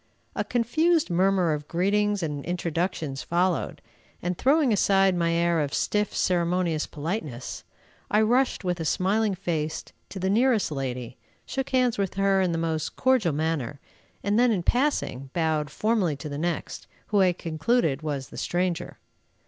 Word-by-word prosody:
A - - 0
confused 310 - +1
murmur 185 -2 +3
of 150 0 -5
greetings 205 +2 +1
and 145 -3 -3
introductions 170 -4 -2
followed, 175 +1 -1 0.4
and, 180 +1 -2
throwing 275 - +3
aside 195 -1 +3
my 170 -1 +1
air 170 0 +2
of 145 -2 -1
stiff, 210 -1 0
ceremonious 175 -3 +1
politeness, 150 - -5 0.5
I 210 - +3
rushed, 245 +3 +2
with 180 -1 -1
a - - -2
smiling 200 +4 +1
face, 160 -4 -3 0.2
to - - -8
the 190 - -1
nearest 225 -1 +2
lady, 125 -4 -4 0.3
shook 270 0 -3
hands 250 -4 +2
with 195 -2 -1
her 195 0 +3
in 185 -2 +1
the 165 - -1
most 160 -1 -2
cordial 255 - +2
manner, 150 -3 -2 0.4
and 205 +3 +2
then, 245 -1 +4
in 190 -6 0
passing, 240 - 0
bowed 160 -3 0
formally 205 -2 0
to 150 +2 -7
the 145 0 -5
next, 170 0 -3 0.2
who 205 -2 +3
I 185 -1 +5
concluded 160 - 0
was 145 -4 -4
the - - -11
stranger. 175 -1 -2
180 Hz, 155 wpm, -26 LUFS, 155-210 Hz, 0.5 s, I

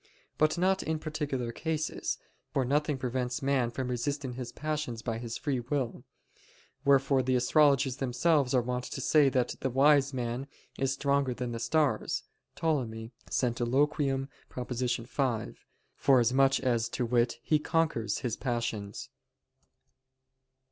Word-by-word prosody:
But 155 +2 +3
not 190 +2 +2
in 160 0 -1
particular 150 -6 -3
cases; 155 +3 -2 0.3
for 135 - +1
nothing 145 +2 +1
prevents 125 0 -2
man 135 -4 +1
resisting 130 +1 -2
his 125 -1 -6
passions 150 -7 -3
by 115 -1 -2
his 115 -1 -5
free 140 -5 -1
will. 125 0 -2 0.8
Wherefore 140 -1 +4
the 130 0 +1
astrologers 135 0 +3
themselves 135 +1 +2
are 125 - +3
wont 125 +1 -2
to - - -5
say 145 +1 +4
that 130 -2 0
"the 135 - -1
wise 140 +2 +4
man 125 +1 -3 0.3
is 135 -1 +1
stronger 140 -1 +1
than 125 -1 -3
the 115 - -4
stars" 145 +5 +1 0.3
[*Ptolemy, 115 -8 -1 0.2
Centiloquium, 135 +3 +1 0.2
prop. 125 0 -6
5], 125 -1 -2 0.3
forasmuch 135 +1 +4
as, 120 -3 +1
to 120 - -2
wit, 120 0 +1
he 155 - +3
conquers 150 -10 0
his 115 -2 0
passions. 115 -5 -3
130 Hz, 130 wpm, -30 LUFS, 120-145 Hz, 0.8 s, Wherefore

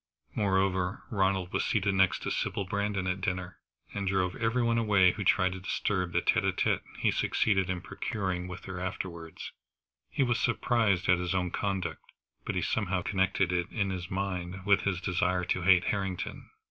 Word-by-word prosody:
Moreover, 95 -1 +1
Ronald 95 -3 +1
was - - +1
seated 100 -2 +1
next 95 0 +2
to - - -2
Sybil 100 - -1
Brandon 100 0 -1
at 95 0 -1
dinner, 90 -1 -3 0.3
and 100 -1 -3
drove 95 -1 +1
every 115 +2 +1
one 115 0 +2
away 100 -5 +5
who 105 - -4
tried 95 0 +3
to 95 - -6
disturb 90 -1 -1
the - - +1
tête - - +3
à - - +2
tête - - +1 0.2
he - - +2
succeeded 95 -3 +1
in 90 -1 -2
procuring 95 -3 -3
with 90 0 -8
her 95 -1 -5
afterwards. 85 -3 -5 0.6
He - - +1
was 120 -2 +1
surprised 115 -6 +1
at 90 -1 +4
his 90 0 -1
own 90 -2 0
conduct, 95 -5 -3 0.3
but - - -2
he - - 0
somehow 95 -4 0
connected 95 -1 +1
it 90 -1 0
in 100 -3 -1
his 90 -2 -5
mind 95 -1 -3
with 100 -1 +4
his 95 -2 0
desire 90 -1 0
to 90 - 0
hate 90 0 +5
Harrington. 95 -2 -3
95 Hz, 185 wpm, -30 LUFS, 90-100 Hz, 0.6 s, away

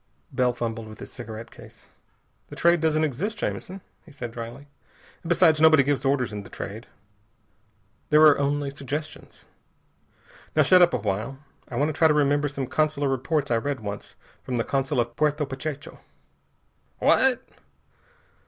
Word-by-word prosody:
Bell 125 -1 +2
fumbled 115 -2 -4
with 110 0 -12
his - - -9
cigarette 115 -2 -8
case. - - -15 0.6
"The - - -9
Trade 170 -1 +3
doesn't 155 -1 +2
exist, 165 - -2
Jamison," 190 +1 -4 0.2
he - - -17
said 120 -4 -7
dryly. 115 +4 -8 0.5
"And 170 - -8
besides, 165 -3 +4
nobody 160 -3 +7
gives 140 0 0
orders 130 -5 +1
in 105 - -4
The 100 - -13
Trade. 105 +4 -7 1.2
There 150 +1 +6
are 150 -2 +7
only 140 0 0
suggestions. 145 +3 -7 1.1
Now - - +5
shut 185 -1 +6
up 175 -1 +5
a - - +1
while. 105 +5 -3 0.3
I 125 - -7
want 145 +5 +1
to - - -3
try 160 +2 +4
to 150 - +2
remember 145 0 +2
some 140 -1 -4
consular 150 0 0
reports 140 +2 -1
I 115 - +3
read 135 +1 -3
once, 100 -1 -7 0.3
from 125 - -3
the 115 - +1
consul 135 -1 -1
at 120 0 -5
Puerto 150 0 +1
Pachecho." 140 +2 -6 1.0
"What?" 260 -2 +3
140 Hz, 160 wpm, -25 LUFS, 120-155 Hz, 1.2 s, nobody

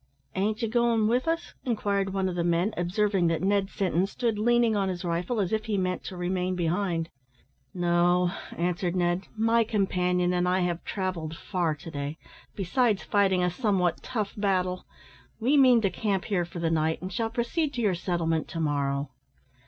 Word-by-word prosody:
"Ain't 215 +4 -1
you - - +2
goin' 230 -1 +2
with 245 +6 +1
us?" 330 +1 -1
inquired 200 -5 0
one 190 -1 0
of 185 - -2
the 175 -1 -1
men, 175 +5 +1
observing 185 +1 +1
that 165 +1 0
Ned 195 0 +2
Sinton 190 -2 0
stood 225 0 -1
leaning 240 0 +3
on 195 -2 +1
his 180 -1 -4
rifle, 175 +7 -1
as 195 0 0
if 220 0 0
he 210 -2 -1
meant 185 -1 -1
to 185 - -6
remain 180 +1 -1
behind. 170 -1 -1 0.6
"No," 175 0 +2 0.3
answered 175 +1 -1
Ned; 175 +1 0
"my 230 +1 +3
companion 180 -4 +1
and 180 0 +1
I 185 +1 +2
have 175 -1 -1
travelled 180 -5 -3
far 175 -5 -1
to 155 +3 -10
day, 145 +1 -4 0.4
besides 205 +2 +1
fighting 190 -3 +2
a 180 - +1
somewhat 185 -5 0
tough 215 -5 -3
battle; 185 -3 0 0.5
we 255 +6 +2
mean 255 -4 +6
to 195 -3 +1
camp 195 0 -1
here 180 -5 0
for 175 +1 -10
the 165 -1 0
night, 160 0 +1
and 185 +1 -5
shall 225 +4 -1
proceed 240 +7 -1
to 240 - -1
your 205 -3 +3
settlement 165 -2 -1
to 165 - -5
morrow." 140 -2 -1
185 Hz, 185 wpm, -27 LUFS, 175-215 Hz, 0.6 s, mean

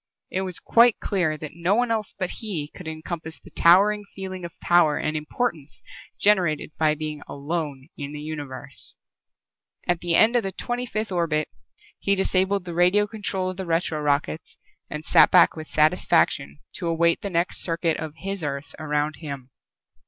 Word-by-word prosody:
It 190 - -1
was 185 -3 -3
quite 235 -1 +4
clear 175 -6 0
that 155 -1 -8
no 170 +4 +1
one 240 0 +1
else 220 -3 -2
but 185 -2 -2
he 175 -10 -3
could 180 - -10
encompass 160 0 -6
the - - -16
towering 205 +5 +5
feeling 185 -2 -6
of 170 - -9
power 170 -4 +4
and 155 0 -2
importance 155 - -3 0.4
generated 180 -8 +2
by 155 -1 +3
being 155 -1 -5
alone 145 -2 -4
in 145 -1 -6
the 150 - -6
Universe. 145 -3 -5 0.9
At 175 -1 +1
the 170 -1 0
end 225 +6 +5
of 240 - +4
the 195 -2 -3
twenty 245 0 -3
fifth 215 -2 -3
orbit 165 -4 0 0.5
he 200 - +2
disabled 190 0 +1
the 175 - -5
radio 180 +4 +4
control 195 -3 -3
of 185 - -11
the 190 - -4
retro 165 -2 0
rockets 150 +2 -1 0.3
and 150 +1 -6
sat - - +6
back 180 - +6
with 155 -1 -7
satisfaction 75 - +2 0.2
to 175 - -3
await 170 0 +2
the 200 - -3
next 170 0 0
circuit 165 -1 0
of 155 -1 -6
his 195 +1 -5
Earth 140 0 -4
around 150 0 -1
Him. 140 -5 -7
170 Hz, 175 wpm, -24 LUFS, 155-190 Hz, 0.9 s, sat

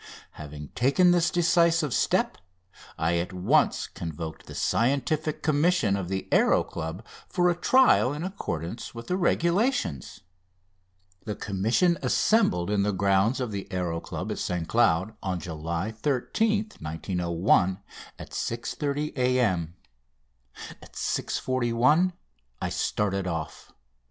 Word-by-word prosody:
Having 75 -1 -9
taken 140 +9 +3
this 175 -1 +3
decisive 170 -4 +2
step - - +1 0.6
I 85 +1 +1
at 85 +3 -2
once 90 0 +2
convoked 80 -1 -7
the - - -9
Scientific 140 +5 0
Commission 150 - +2
of 95 -3 -4
the 95 0 -3
Aéro - - +3
Club 80 +7 -6 0.2
for 180 -1 +2
a - - -1
trial 250 - +4
in 150 +3 -4
accordance 115 - -5
with 115 0 -7
the 180 - -1
regulations. 170 - 0 1.0
The 105 -2 -3
Commission 115 - +1
assembled 105 - +2
in 105 -1 +2
the 105 +1 +1
grounds 100 +5 +2
of 125 -4 -2
the 100 -1 -5
Aéro 90 -3 -2
Club - - -5
at - - -4
St 90 -3 -2
Cloud 110 -3 +2
on 95 -3 -2
July 85 +4 -4
13th, 210 - -1
1901 90 +3 +1 0.4
at - - -10
6.30 140 +5 -3
A.M. 115 - +1 1.1
At - - -15
6.41 130 +8 +1 0.5
I - - -2
started 100 -2 -1
off. 80 -4 -5
110 Hz, 120 wpm, -26 LUFS, -, 1.1 s, trial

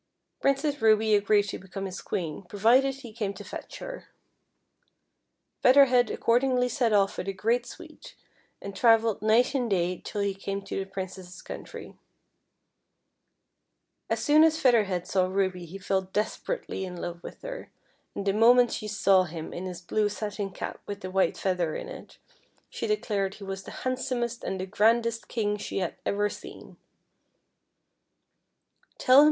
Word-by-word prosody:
Princess 275 0 +1
Ruby 220 0 +4
agreed 205 0 +4
to 200 - -5
become 195 +1 -6
his 190 0 -6
Queen 160 -5 -3
provided 250 +7 +3
he 250 -5 -11
came 205 -3 -3
to - - -9
fetch - - -8
her. - - -8 1.6
Feather 275 +2 +7
Head 245 -3 +3
accord 235 +1 +2
ingly 250 -2 +1
set 235 -1 +1
off 200 -2 +2
with 185 - -4
a 195 - -1
great 230 +5 0
suite, 320 -4 -12 0.5
and 200 0 -6
travelled 225 0 +4
night 220 +5 +3
and 250 -4 0
day 180 -2 0
till 205 - -3
he 200 -1 0
came 195 +1 -5
to 195 - -4
the 195 0 -5
Princess's 185 -1 -7
countr\\ - - -9 2.1
As - - -1
soon 305 +1 +6
as 320 0 +3
Feather 245 -7 +4
Head 180 -2 -3
saw 185 -1 +1
Ruby 185 -2 -1
he 185 +5 -8
fell 195 0 0
desperately 205 - -3
in 180 -1 -6
love 175 0 -5
with - - -11
her, - - -7 0.5
and 200 - -4
the 195 - +2
moment 240 +3 +6
she 215 - -4
saw 195 -3 +3
him 160 -2 -7
in 185 +2 -5
his 180 -1 -7
blue 210 +4 0
satin 205 -1 -4
cap 190 - -6
with 200 0 -6
the 185 - -6
white 190 -2 +2
feather 180 -4 -1
in - - -5
it, - - -11 0.5
she - - -3
declared 205 - -1
he 205 - -11
was 195 0 -6
the - - -8
handsomest 250 -2 -2
and 190 - -3
the 185 - -2
grandest 230 +3 +2
King 210 -3 -1
she - - -5
had 185 -3 -2
ever 205 +1 +1
seen. - - -10
205 Hz, 165 wpm, -27 LUFS, 190-240 Hz, 2.1 s, Feather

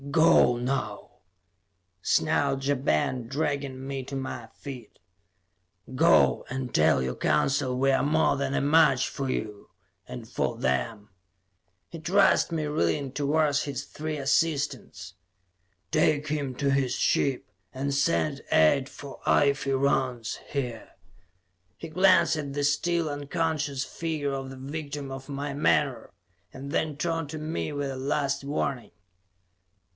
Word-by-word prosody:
"Go, 160 -5 +5
now!" 120 -4 -3 0.9
snarled 135 +7 +1
Ja 145 - +3
Ben, 125 - 0
dragging 140 -1 -2
me 135 -1 -4
to 135 - -6
my 130 -3 -5
feet. 125 0 -10 1.0
"Go, 165 +6 +4
and 130 -1 -4
tell 75 -4 +3
your 65 0 -3
Council 125 - +1
we 135 +1 +3
are 135 - +2
more 155 +2 +2
than 140 0 -2
a - - +1
match 145 -3 +4
for 135 -1 -4
you 105 -4 -4 0.4
and 65 - -8
for - - -2
them." 105 - -1 0.8
He 165 - -9
thrust 185 +3 +3
me, 160 -2 -1
reeling, 135 - 0
towards 145 +1 +1
his 140 -1 -4
three 155 +1 -5
assistants. 145 - -1 0.8
"Take 150 -1 +2
him 145 -4 -2
to 140 +1 0
his 135 -2 +1
ship, 135 -3 +1 0.3
and 140 +2 -3
send 140 0 +1
aid 130 - +4
for 140 -2 -10
Ife 140 -1 +3
Rance, 130 -3 0
here." 125 -5 -4 0.8
He 165 - -8
glanced 170 -2 +4
at 145 -3 -4
the 145 0 -2
still 165 +4 +1
unconscious 145 -1 -2
figure 155 -4 -3
of 135 -1 -4
the 135 - -9
victim 140 0 -6
of 135 +1 -8
my 140 0 -4
menore, 145 -2 +1 0.4
and 140 +2 -8
then 155 -2 -1
turned 165 -1 -2
to 155 - -5
me 155 0 -3
with 145 -1 -3
a - - -5
last 140 +1 -1
warning. 140 -3 -3
140 Hz, 135 wpm, -27 LUFS, 130-150 Hz, 1.0 s, Go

